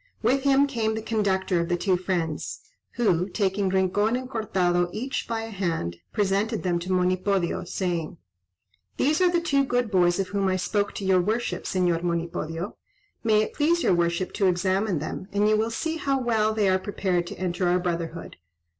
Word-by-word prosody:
With 260 +5 +3
him 275 0 +4
came 225 -5 -1
the 220 - -3
conductor 190 -5 0
of 170 +1 -1
the 175 - +1
two 185 +1 +2
friends; 175 -4 -3 0.3
who, 185 -6 +1
taking 195 0 0
Rincon 190 +4 +2
and 255 0 -3
Cortado 180 -7 0
each 260 +7 -3
by 230 -1 -2
a 225 - -7
hand, 165 - -2
presented 205 +2 0
them 175 -2 +1
to 180 +2 -5
Monipodio, 185 0 +1
saying, 175 -2 -3 0.8
"These 305 +5 +2
are 365 - +5
the 345 0 +2
two 280 -5 +2
good 245 -4 0
boys 175 -2 +3
of 195 - -1
whom 200 -1 0
I 185 - +1
spoke 200 +3 -1
to 200 - -5
your 190 -1 +4
worship, 220 +6 -2
Señor 175 -3 +1
Monipodio. 170 +1 -3 0.5
May 215 -2 +4
it - - -5
please 335 +3 +2
your - - +4
worship 170 +1 0
to 195 - +2
examine 185 +1 +1
them, 155 +5 -5
and 205 +1 +2
you 215 - +4
will 220 +1 +1
see 320 +8 -2
how 275 -3 0
well 220 -3 +1
they 215 -2 +1
are 190 0 +3
prepared 185 -3 -1
to - - -7
enter 180 0 -1
our 175 +1 +3
brotherhood." 170 -2 -4
190 Hz, 190 wpm, -25 LUFS, 175-220 Hz, 0.8 s, are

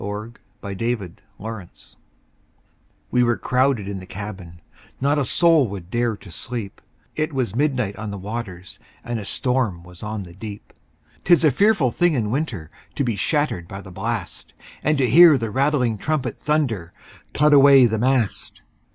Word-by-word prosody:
W 105 +3 -5
X. - - -24 0.2
Y 100 - -5
Z 120 +1 +1
Ballad 95 -7 -11 0.2
of - - -37
the 110 - -4
Tempest 100 -6 -12 1.2
WE 125 - +3
were 120 -1 +2
crowded 130 -5 +1
in 100 -1 -4
the 90 - -11
cabin, 95 -4 -8 0.4
Not 145 +2 +2
a 140 - 0
soul 165 -1 +4
would 95 -3 -8
dare 120 -2 0
to 95 - -14
sleep, 115 +3 -6 0.3
It 155 +1 -1
was 125 -7 -2
midnight 125 -7 0
on 110 -1 -5
the 100 - -5
waters, 95 -3 -7 0.2
And 120 -1 -3
a 105 - -7
storm 120 -10 -1
was 90 0 -14
on 105 -1 -4
the 85 -2 -12
deep. 100 +2 -9 0.5
'Tis 175 -2 +5
a 155 - +5
fearful 185 - +3
thing 175 +2 +2
in 110 -4 -1
winter 115 - -3 0.2
To 140 - 0
be 120 -4 -1
shattered 100 - -1
by 95 - -7
the 95 -1 -11
blast, 100 0 -5 0.3
And 150 0 +1
to 130 -2 +2
hear 160 +4 +8
the 115 -3 -3
rattling 130 -4 +1
trumpet 155 -3 -2
Thunder, 125 - -1 0.4
"Cut 150 0 +4
away 140 -2 +8
the 110 -2 0
mast!" 125 -3 -1
115 Hz, 180 wpm, -22 LUFS, 100-140 Hz, 1.2 s, hear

